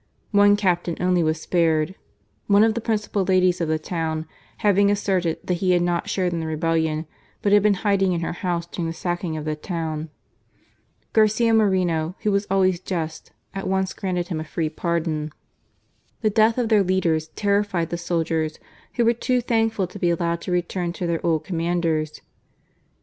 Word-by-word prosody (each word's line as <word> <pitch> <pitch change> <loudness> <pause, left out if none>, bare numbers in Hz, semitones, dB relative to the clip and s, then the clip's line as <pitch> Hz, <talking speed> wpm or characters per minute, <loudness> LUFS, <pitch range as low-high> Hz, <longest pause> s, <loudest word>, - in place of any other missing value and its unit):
One 205 0 +6
captain 175 -4 0
only 180 -1 +2
was 155 -1 0
spared, 160 0 +1 0.5
one 200 +1 +5
of 225 0 +3
the 235 - -3
principal 210 -3 -1
ladies 185 -1 +2
of 165 - 0
the 160 0 +1
town 160 -1 -3 0.4
having 200 0 +4
asserted 190 -5 0
that 180 - 0
he 185 -1 +3
had 175 -1 +3
not 175 -1 -1
shared 180 -2 0
in 170 - -1
the 160 - -3
rebellion, 160 0 0 0.4
but 205 - +2
had 205 - +7
been 210 0 +3
hiding 195 -2 +3
in 170 -1 -1
her 165 - -2
house 175 -1 -2
during 170 -1 -4
the 165 - -4
sacking 175 -2 -3
of 155 - -5
the 155 0 -1
town. 160 -1 -4 1.0
Garcia 220 +1 +3
Moreno, 185 -6 +2
who 210 - +2
was 200 +1 0
always 185 -2 +2
just, 165 -4 -5 0.2
at 195 -1 -4
once 190 -1 0
granted 180 -2 -3
him 165 -4 -2
a - - -3
free 160 0 -2
pardon. 160 -2 -2 0.9
The 215 -2 +2
death 220 +2 +3
of 240 -3 0
their 215 -3 +5
leaders 175 -4 +1
terrified 200 -5 0
the - - 0
soldiers^ 165 -2 -1 0.4
who 240 - +2
were 235 - +4
too 250 +2 0
thankful 225 -4 +1
to 185 +3 -10
be 175 - +2
allowed 170 0 0
to 180 - -5
return 175 0 -1
to 180 - -4
their 170 -1 -1
old 160 -2 +1
commanders. 165 -3 -1
175 Hz, 180 wpm, -23 LUFS, 165-200 Hz, 1.0 s, had